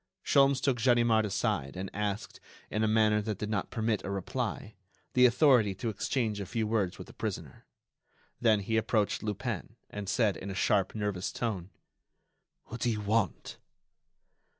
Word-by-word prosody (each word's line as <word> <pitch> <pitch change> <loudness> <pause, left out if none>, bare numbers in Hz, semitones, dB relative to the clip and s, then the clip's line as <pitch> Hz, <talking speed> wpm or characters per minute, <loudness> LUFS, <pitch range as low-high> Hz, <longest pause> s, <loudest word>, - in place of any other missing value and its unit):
Sholmes 140 -1 +4
took 130 -3 0
Ganimard 120 -3 +4
aside 70 -6 -1
and 95 +1 -5
asked, 105 0 -3 0.3
in 110 - 0
a - - +3
manner 110 -1 +3
that 105 -2 -3
did 105 +1 -4
not 100 -4 -1
permit 110 -2 -1
a - - -5
reply, 105 +3 -3 0.4
the 125 0 +7
authority 125 -6 +4
to 115 +5 -3
exchange 110 0 -1
a 100 - -5
few 115 +1 -1
words 105 -5 0
with - - -8
the - - -14
prisoner. - - -5 0.7
Then 110 -3 +3
he 110 +3 0
approached 110 -2 +1
Lupin, 110 0 -4 0.2
and 105 -2 -5
said, 105 -4 +2
in 100 - -7
a 95 - -5
sharp, 95 +1 +1
nervous 105 -4 -2
tone: 100 -7 -3 1.0
"What 115 - -8
do 120 - +2
you 110 -2 -1
want?" 105 -3 -1
110 Hz, 165 wpm, -30 LUFS, 100-115 Hz, 1.0 s, the